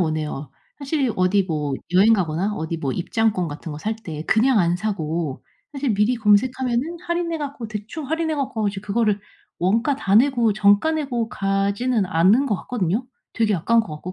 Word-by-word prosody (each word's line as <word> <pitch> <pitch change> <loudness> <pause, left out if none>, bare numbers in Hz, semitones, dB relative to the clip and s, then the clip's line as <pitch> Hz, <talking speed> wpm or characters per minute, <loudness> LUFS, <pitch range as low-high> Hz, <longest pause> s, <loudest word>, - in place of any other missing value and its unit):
오네요. 155 -4 -2 0.3
사실 275 -4 -1
어디 185 +2 +3
뭐 150 -5 -2 0.2
여행 200 +5 +6
가거나 190 +1 0
어디 160 -2 -3
뭐 140 -5 -2
입장권 205 0 0
같은 150 +2 -7
거 150 - -7
살 220 +6 -2
때 160 -8 -7
그냥 230 +1 +3
안 175 -1 +2
사고 165 -7 -3 0.3
사실 275 -4 -1
미리 210 +5 +2
검색하면은 250 +8 +1
할인해 340 -1 -1
갖고 280 -6 -5
대충 220 +8 -6
할인해 320 0 0
갖고 265 -7 -2
이제 195 -1 -5
그거를 210 0 0 0.4
원가 230 - +2
다 195 -7 -1
내고 240 -2 +4
정가 205 +8 +3
내고 250 -7 -2
가지는 200 +3 0
않는 185 +11 +3
것 215 -6 0
같거든요 220 +1 -1 0.3
되게 220 -2 +1
아까운 230 +7 +3
것 160 -8 -6
같고 180 +4 -7
210 Hz, 350 characters per minute, -22 LUFS, 180-250 Hz, 0.4 s, 여행